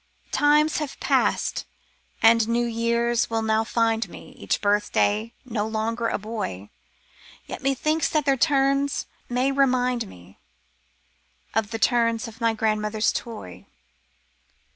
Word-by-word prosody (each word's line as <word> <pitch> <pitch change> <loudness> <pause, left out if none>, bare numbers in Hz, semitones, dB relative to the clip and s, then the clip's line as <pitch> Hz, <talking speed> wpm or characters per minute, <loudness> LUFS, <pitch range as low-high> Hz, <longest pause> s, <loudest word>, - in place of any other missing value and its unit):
Times 300 +2 +3
have 300 -3 -5
passed, - - 0 0.6
and 225 0 +6
new 235 +1 +1
years 235 0 0
will 225 -1 -1
now 220 0 +2
find 225 -2 0
me, - - -12
Each - - -1
birthday, 210 +1 +1
no 220 -4 -2
longer 225 +1 -1
a - - -1
boy, 200 - -5 0.7
Yet - - -7
methinks 290 +4 +1
that 305 -2 0
their 275 -1 +3
turns 275 0 +2 0.2
may 250 +3 +1
remind 250 -4 +1
me 90 - -16 1.1
Of 220 -1 0
the 225 - -3
turns 230 0 +2
of 225 +1 -12
my 230 -1 +2
grandmother's 215 0 0
toy. 220 - -7
230 Hz, 125 wpm, -24 LUFS, 220-255 Hz, 1.1 s, and